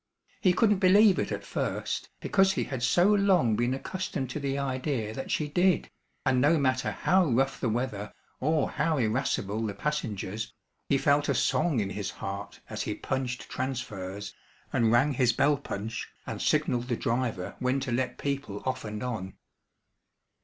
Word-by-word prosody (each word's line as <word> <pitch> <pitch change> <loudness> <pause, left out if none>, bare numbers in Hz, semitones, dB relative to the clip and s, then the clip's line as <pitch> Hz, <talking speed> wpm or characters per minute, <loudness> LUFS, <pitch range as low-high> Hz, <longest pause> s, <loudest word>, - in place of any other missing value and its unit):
He 185 - +5
couldn't 210 +1 +3
believe 200 +1 +6
it - - -1
at - - -3
first, - - -2
because 195 -1 +3
he - - 0
had 130 -3 -4
so 150 +8 +4
long 185 - +4
been 120 +3 +1
accustomed 135 -4 -4
to 150 - -3
the 140 -1 -1
idea 130 -4 -2
that 135 - -5
she 150 - 0
did, 175 +3 +2 0.3
and 125 -1 +3
no 155 +4 +5
matter 130 -3 +1
how 185 -1 +3
rough 135 +1 +1
the 120 - 0
weather 110 -3 -2 0.3
or 155 +1 +1
how 160 -2 +1
irascible 110 -3 0
the 105 -3 -3
passengers, 110 -6 -3 0.3
he 140 - +4
felt 145 +1 +2
a - - +2
song 155 -9 +2
in 100 -2 -1
his 100 -1 -3
heart 100 +1 -6
as - - -4
he - - -2
punched 130 -2 -3
transfers, 105 -7 -4 0.4
and 115 -2 +3
rang 130 +5 +4
his 125 -2 +3
bell 145 +1 +3
punch, 110 -5 -5 0.2
and - - -5
signalled 120 0 +1
the 120 -3 -1
driver 115 -6 -1
when 130 +2 +1
to 130 -2 -3
let 125 0 -1
people 140 -8 -3
off 130 - -2
and 105 +1 -5
on. 110 -7 -4
130 Hz, 170 wpm, -28 LUFS, 110-150 Hz, 0.4 s, believe